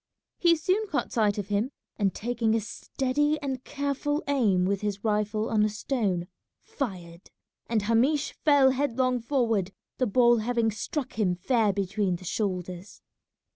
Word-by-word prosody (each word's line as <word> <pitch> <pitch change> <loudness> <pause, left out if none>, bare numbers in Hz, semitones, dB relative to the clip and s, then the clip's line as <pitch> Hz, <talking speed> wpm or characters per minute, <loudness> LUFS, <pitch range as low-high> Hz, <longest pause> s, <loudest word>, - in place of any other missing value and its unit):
He 340 -1 +5
soon 380 +7 0
caught 295 - -2
sight 210 -3 +1
of 205 -1 -4
him, 205 +5 0 0.3
and 200 -3 +1
taking 230 0 0
a - - +2
steady 270 +7 -1
and 265 -3 -4
careful 285 +1 -2
aim 215 -10 +2
with 200 0 0
his 205 -1 -3
rifle 215 0 0
on 215 -1 +3
a 215 - +2
stone, 205 -5 -1 0.4
fired, 180 - -6 0.4
and 225 -3 0
Hamish 255 +7 +2
fell 285 -3 +5
headlong 255 -2 0
forward, 225 -7 0 0.3
the 255 - +2
ball 240 +2 +4
having 230 0 +1
struck 240 +4 -4
him 185 -4 +2
fair 220 +3 +2
between 195 -1 -1
the 185 +2 -10
shoulders. 185 -1 -4
225 Hz, 150 wpm, -27 LUFS, 200-265 Hz, 0.4 s, He